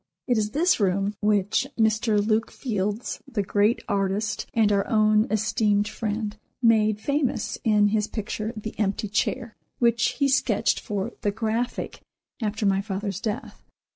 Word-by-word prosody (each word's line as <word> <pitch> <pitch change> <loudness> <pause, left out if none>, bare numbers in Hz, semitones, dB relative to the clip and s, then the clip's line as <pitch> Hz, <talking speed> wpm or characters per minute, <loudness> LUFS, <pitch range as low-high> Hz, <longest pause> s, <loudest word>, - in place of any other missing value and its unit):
It 245 - +2
is 210 -1 0
this 330 +8 +2
room 195 +1 +1
which 210 +4 +2
Mr. 220 -1 +2
Luke 220 +1 +1
Fildes, 210 -2 -3
the 205 -4 -1
great 205 +4 +1
artist 200 +1 -1
and 220 -2 +3
our 200 -1 +1
own 215 0 +3
esteemed 210 -1 +1
friend, 215 -1 -3 0.2
made 215 -3 +3
famous 280 +2 -1
in 210 -2 +4
his 210 0 +1
picture 215 0 -4
"The 215 +1 -5
Empty 205 0 -1
Chair," 230 +2 -1 0.2
which 235 0 +2
he 280 +1 +1
sketched 270 -1 +2
for 205 -4 -3
"The 205 - +1
Graphic" 225 +3 -2 0.4
after 215 0 -1
my 195 -1 +3
father's 200 -1 -4
death. 220 -1 -5
215 Hz, 145 wpm, -25 LUFS, 205-230 Hz, 0.4 s, in